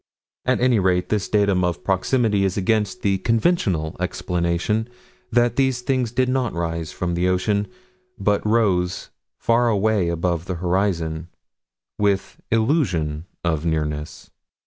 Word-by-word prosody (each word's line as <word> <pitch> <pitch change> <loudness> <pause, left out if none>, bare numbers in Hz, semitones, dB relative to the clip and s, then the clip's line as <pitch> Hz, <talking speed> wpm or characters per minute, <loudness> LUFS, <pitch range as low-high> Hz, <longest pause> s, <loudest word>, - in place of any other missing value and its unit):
At 130 - +2
any 125 -3 +3
rate, 90 -1 +1
this 105 -2 -1
datum 100 -3 +2
of 90 -1 -1
proximity 100 +2 +1
is 95 +1 0
against 105 0 0
the 100 -1 +2
conventional 105 - +1
explanation 90 +4 -1 0.4
that 120 0 +2
these 130 -2 +2
things 125 -2 0
did 130 +1 +1
not 130 -3 0
rise 85 -2 -3
from 90 -1 -2
the 90 +1 +1
ocean, 100 +3 +1 0.5
but 100 0 +1
rose 100 -5 +1 0.3
far 120 +1 +2
away 105 -4 +2
above 85 0 -1
the 95 - -3
horizon, 85 -3 -1 0.7
with 100 -2 0
illusion 95 - +1 0.2
of 80 -3 0
nearness. 75 -2 -3
95 Hz, 130 wpm, -22 LUFS, 85-115 Hz, 0.7 s, any